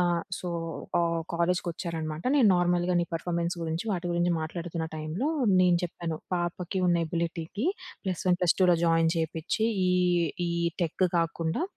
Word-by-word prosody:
ఆహ్, 175 -1 +2 0.2
సో, 180 - -5 0.5
ఆహ్, 170 -1 +1
కాలేజ్‌కొచ్చారనమాట 170 -2 -2
నేను 235 -7 +6
నార్మల్‌గా 175 0 +2
నీ 175 - +1
పెర్ఫార్మెన్స్ 170 +1 -1
గురించి, 165 +3 -2
వాటి 175 -1 -2
గురించి 175 0 +2
మాట్లాడుతున్న 165 0 -4
టైమ్‌లో 155 - -2 0.3
నేను 180 -1 +5
చెప్పాను, 170 -2 -4 0.2
'పాపకి 175 +2 -2
ఉన్న 175 -1 +3
ఎబిలిటీకి 170 - -3 0.4
ప్లస్ 185 -2 -2
1, 180 - +4
ప్లస్ 180 -2 +3
2లో 180 -2 +5
జాయిన్ 165 -1 +3
జెపిచ్చి 165 +7 -1 0.2
ఈ - - +3 0.6
ఈ - - -2 0.3
టెకు 175 +2 +1
కాకుండా 165 - -1
170 Hz, 145 wpm, -28 LUFS, 165-180 Hz, 0.6 s, నేను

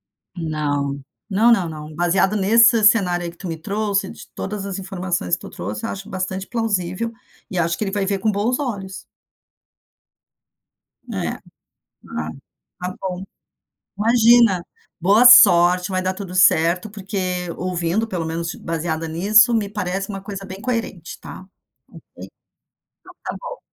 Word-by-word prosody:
É. - - -16
Não, 145 -3 -2 0.3
não, 220 +4 +4
não, 195 -7 +3
não. 155 -1 -9
Baseado 175 +4 +2
nesse 230 +3 +5
cenário 180 -5 +3
aí 170 - -4
que 170 - -21
tu 185 - -7
me 165 - -4
trouxe, 200 +3 -1
de - - -12
todas 200 0 -5
as 195 -1 -4
informações 185 - -3
que - - -16
tu - - -9
trouxe, 100 +4 -6
eu - - -3
acho 195 0 -7
bastante 190 0 -3
plausível 225 -2 -2 0.4
e 185 - -5
acho 165 0 +1
que - - -2
ele 195 - -3
vai 200 -1 -1
ver 195 0 -1
com 215 +2 +1
bons 215 +6 0
olhos. 200 -8 -5 2.1
É, - - -3 0.7
ah, 80 0 -4 0.5
tá 180 +1 -4
bom. 185 0 -4 0.7
Imagina. 230 -4 +4 0.3
Boa 205 +7 +4
sorte, 180 -7 +7
vai 185 0 0
dar 185 0 -1
tudo 190 -2 -8
certo. 180 +2 +3
Porque, 200 0 -7 0.4
ouvindo, 180 +4 -1
pelo 180 -6 -3
menos 165 +1 -4
baseada 165 0 -3
nisso, 210 +8 +4
me 215 -3 0
parece 195 -1 -3
uma 195 -1 -5
coisa 195 0 -7
bem 190 +1 -9
coerente 230 -8 -4
tá, - - -10 0.6
ok. - - -13 0.8
Então - - -15
tá - - -4
bom. - - -7
190 Hz, 155 wpm, -21 LUFS, 175-210 Hz, 2.1 s, sorte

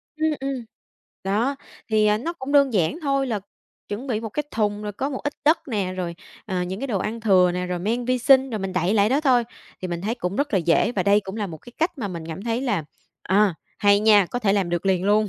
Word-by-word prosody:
Ừm, 315 0 +1
ừm. 270 -3 -4 0.6
Đó, 230 +8 0 0.3
thì, 215 -1 +3
ờ, 210 0 +3
nó 330 +8 -3
cũng 280 -5 -6
đơn 280 -3 +5
giản 195 - +1
thôi 275 -2 +1
là 220 -5 -2 0.5
chuẩn 220 +7 -5
bị 220 -4 -1
một 225 - -4
cái 295 +8 -2
thùng 210 -1 -1
rồi 210 -1 -4
có 270 +8 -3
một 265 - -4
ít 290 - -1
đất 315 +3 +5
nè, 200 -5 -1
rồi, 175 -2 -3 0.3
à, 185 -3 -1
những 190 +3 -5
cái 275 - -2
đồ 210 -7 -1
ăn 225 +5 -3
thừa 185 -5 +4
nè, 180 0 -2
rồi 180 0 -2
men 225 +7 -1
vi 255 +1 +1
sinh, 265 +2 +5
rồi 220 - -2
mình 195 -1 -4
đậy 180 +3 +1
lại 205 -1 +4
đó 270 +5 +2
thôi. 255 -5 +3 0.4
Thì 185 - -3
mình 170 -1 -3
thấy 215 +5 -2
cũng 195 -5 -3
rất 285 0 -1
là 195 - +4
dễ 170 +7 +2
và 190 - 0
đây 200 +2 +4
cũng 195 +1 -7
là 210 - -2
một 160 -4 -8
cái 240 - -15
cách 330 -2 0
mà 210 - -3
mình 170 -3 -6
cảm 165 +4 -6
thấy 230 +1 -1
là, 205 - -1 0.4
à, 195 0 +3 0.2
hay 200 0 +4
nha, 210 -3 +5
có 245 - -3
thể 210 -5 +2
làm 195 -3 +1
được 175 +2 -1
liền 185 -1 +2
luôn. 210 +1 +3
210 Hz, 265 wpm, -23 LUFS, 190-255 Hz, 0.6 s, đơn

